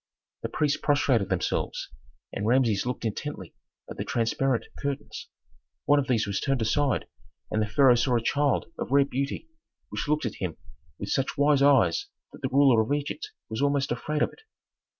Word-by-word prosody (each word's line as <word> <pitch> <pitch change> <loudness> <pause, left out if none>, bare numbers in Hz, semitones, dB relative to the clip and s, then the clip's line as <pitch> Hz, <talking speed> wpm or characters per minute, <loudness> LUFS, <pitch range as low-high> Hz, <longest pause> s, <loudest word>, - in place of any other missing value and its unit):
The - - -3
priests 150 -1 0
prostrated 135 -8 +2
themselves, - - -1 0.5
and 100 - -2
Rameses 120 -3 +2
looked 125 -1 -3
intently 110 - -4 0.3
at - - -9
the - - -2
transparent 120 +2 0 0.2
curtains. 140 -1 -4 0.6
One 145 0 +5
of 135 - -2
these 115 -4 +2
was 100 -2 -2
turned 135 -5 0
aside 140 +5 +1 0.5
and 110 - +1
the 105 - 0
pharaoh 125 +4 +5
saw 120 +1 +2
a 115 - -2
child 140 +2 +1
of - - -3
rare 140 +1 +5
beauty 140 - -3 0.4
which - - -4
looked 150 -1 +1
at 115 - -5
him 90 -4 -3 0.4
with - - -6
such 135 - -1
wise 145 0 +4
eyes 130 -12 +4 0.3
that - - -13
the - - -1
ruler 135 -4 +5
of 110 - -3
Egypt 145 - -2 0.2
was 110 +3 -4
almost 140 -2 +1
afraid 150 +5 -1
of - - +1
it. - - -18
135 Hz, 180 wpm, -27 LUFS, 115-145 Hz, 0.6 s, One